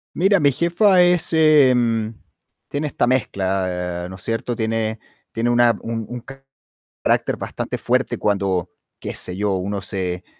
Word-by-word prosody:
Mira, 195 0 +3
mi 140 -1 +4
jefa 180 - +3
es, 175 -1 +3
em 125 -8 +4 0.5
tiene 145 +1 -3
esta 125 - 0
mezcla, 95 -7 -1
¿no 95 - -8
es - - -9
cierto? 115 +1 -2
Tiene 110 0 -1 0.3
tiene 115 +1 -1
una 120 -2 +4
un 115 -1 -4
un 120 -1 -6 0.8
carácter - - +1
bastante - - -4
fuerte - - 0
cuando, 95 -4 0 0.3
qué - - -5
sé 90 +1 -2
yo, 105 -1 0
uno 100 +2 -3
se, 90 -3 -3
115 Hz, 145 wpm, -21 LUFS, 95-140 Hz, 0.8 s, mi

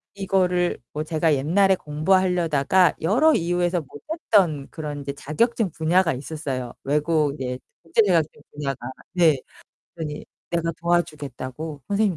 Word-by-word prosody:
이거를 180 -2 +1
뭐 155 +1 -2
제가 160 0 +1
옛날에 190 +8 +3
공부하려다가 175 0 +2
여러 255 - +4
이유에서 175 - +1
못했던 160 - 0
그런 150 -3 -6
이제 140 0 -4
자격증 205 - 0
분야가 165 +2 +2
있었어요, 135 -3 -5
외국 150 +1 +1
이제 125 -2 -4 0.2
국제 165 +7 +3
자격증 165 -6 +1
분야가. 135 -4 -4 0.2
네. 160 -7 +4 0.5
그랬더니 155 -3 -5 0.3
내가 170 -1 0
도와주겠다고 155 -3 -2
선생님 200 -3 +1
160 Hz, 325 characters per minute, -24 LUFS, 145-180 Hz, 0.5 s, 여러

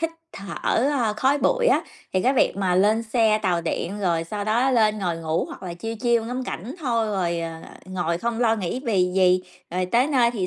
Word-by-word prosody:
hít 330 0 0 0.2
thở, 195 0 -8 0.4
ơ, 240 -7 +1
khói 265 +6 +2
bụi - - +2
á, - - +4 0.3
thì 185 - +2
cái 260 - +3
việc 255 - +2
mà 185 -2 +1
lên 210 +5 +3
xe 220 -1 +2
tàu 175 -3 +1
điện 170 +4 -3
rồi 170 -4 0
sau 205 +4 -4
đó 235 +5 +2
lên 215 -4 +3
ngồi 175 -4 -1
ngủ 160 0 -1
hoặc - - -10
là 175 -2 -5
chill, 225 +6 -5
chill 235 -2 +2
ngắm 250 +2 -3
cảnh 235 +2 -6
thôi 235 -6 0
rồi, 175 -5 -1
ờ, 165 -1 -6 0.2
ngồi 175 -2 -2
không 235 +3 -2
lo 225 -2 +3
nghĩ 195 +5 -3
vì 185 -6 +1
gì, 185 -1 +4 0.3
rồi 180 +1 -1
tới 240 +8 +3
nơi 250 -6 +3
thì 205 -6 -2
210 Hz, 225 wpm, -23 LUFS, 180-235 Hz, 0.4 s, á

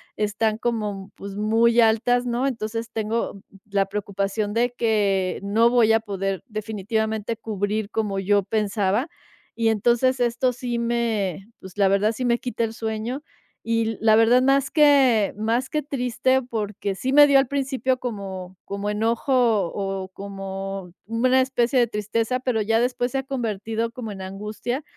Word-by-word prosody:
están 215 +1 0
como, 210 -4 -3
pues, 200 0 -8
muy 230 +3 +3
altas, 235 +2 +3
¿no? 245 +2 -1
Entonces 230 -3 -3
tengo 220 -2 -2 0.3
la 195 -1 +2
preocupación 200 +1 -2
de 240 +1 +1
que 200 -6 +1
no 220 +4 +3
voy 235 -2 +4
a 225 - +3
poder, 195 -4 -3
definitivamente, 220 +1 -2
cubrir 210 0 -2
como 210 -3 -1
yo 200 +1 +2
pensaba 210 - 0 0.5
y 230 -1 +2
entonces 240 +4 +2
esto 245 +1 +1
sí 245 -1 -4
me, 225 -5 -1
pues, 190 0 -12
la 200 -1 +4
verdad, 200 +3 +2
sí 250 +3 -3
me 240 -1 +3
quita 240 -2 -2
el 225 - -6
sueño 225 +5 -4 0.4
y, 230 -1 0
la 220 -1 +5
verdad, 235 +3 +5
más 275 +1 +2
que 270 -9 +4
más 230 +4 0
que 305 - -1
triste, 260 -1 0
porque 210 -4 -4
sí 260 +7 -2
me 295 +1 +9
dio, 280 -1 +6
al 270 - +1
principio, 265 -2 -1
como 190 -6 -6
como 200 +1 -4
enojo, 225 +5 -1 0.4
o 195 -1 -3
como 195 -1 -6
una 250 +4 +2
especie 255 0 +1
de 240 - +4
tristeza, 225 +4 -1
pero 240 -4 0
ya 225 +2 +2
después, 245 0 0
se 270 - +1
ha 265 - -4
convertido 225 -3 -2
como 230 -3 -6
en 190 - -8
angustia 210 +8 -4
225 Hz, 160 wpm, -23 LUFS, 200-245 Hz, 0.5 s, me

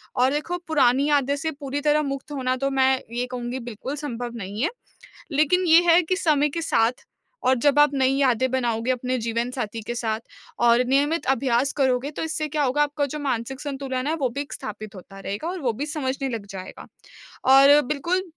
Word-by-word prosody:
और 255 +2 +3
देखो 305 +4 -2
पुरानी 275 -3 +3
यादें 285 -1 +2
से 320 +2 -3
पूरी 285 0 -3
तरह 300 +1 +3
मुक्त 275 +1 -5
होना 255 -3 -1
तो 275 - +2
मैं 265 -1 +2 0.2
ये 245 +1 0
कहूँगी 245 +1 -4
बिल्कुल 245 +3 -6
संभव 245 -5 -5
नहीं 205 0 -5
है। 330 - +2 0.6
लेकिन 310 +6 +2
ये 325 +1 +8
है 340 +2 +6
कि 360 +2 -1
समय 300 -5 +2
के 330 +4 -4
साथ 240 -6 +1 0.4
और 260 - +4
जब 290 0 +4
आप 295 -1 +6
नई 265 -1 +2
यादें 260 -2 +2
बनाओगे 240 -2 0
अपने 255 0 -1
जीवनसाथी 230 0 -3
के 240 - -3
साथ 220 -2 -2 0.5
और 235 +1 +5
नियमित 290 +5 +1
अभ्यास 260 +2 +1
करोगे 260 +1 +1
तो 305 - -5
इससे 310 -1 -2
क्या 300 0 0
होगा 280 +2 +2
आपका 290 0 -1
जो - - -4
मानसिक 265 -2 -3
संतुलन 270 -2 -3
है 315 - +1
वो 275 -6 -1
भी 280 +4 -4
एक 285 - -7
स्थापित 215 0 -7
होता 195 +1 -12
रहेगा 200 +9 -5
और 370 +1 -4
वो 245 -4 0
भी 275 +7 -4
समझने 275 -3 -3
लग 225 -5 -5
जाएगा। 190 -1 -9 0.7
और 280 +2 +7
बिल्कुल 340 +6 -1
270 Hz, 200 wpm, -24 LUFS, 245-295 Hz, 0.7 s, ये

